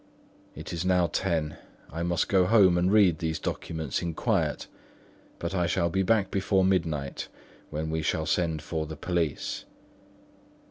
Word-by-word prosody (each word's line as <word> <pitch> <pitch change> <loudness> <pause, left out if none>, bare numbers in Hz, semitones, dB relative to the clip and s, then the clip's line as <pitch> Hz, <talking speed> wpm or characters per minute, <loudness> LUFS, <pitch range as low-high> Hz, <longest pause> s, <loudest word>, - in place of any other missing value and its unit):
It - - -7
is 85 0 -2
now 90 -1 +3
ten; 75 -2 -1 0.4
I 80 - -3
must 85 -1 0
go 95 -2 +3
home 100 -5 +6
and 90 +2 +2
read 95 -7 +5
these 80 -1 -1
documents 80 -2 -3
in 85 -2 -3
quiet; - - 0 0.7
but 85 +2 -4
I 90 -2 +1
shall 85 0 +1
be 95 - +1
back 95 0 +2
before 95 -1 +2
midnight, 80 -7 -1 0.4
when 80 +1 -3
we 80 0 -1
shall 80 0 0
send 80 -2 0
for 80 0 -3
the 80 0 -7
police." 85 -4 -2
85 Hz, 155 wpm, -27 LUFS, 80-95 Hz, 0.7 s, home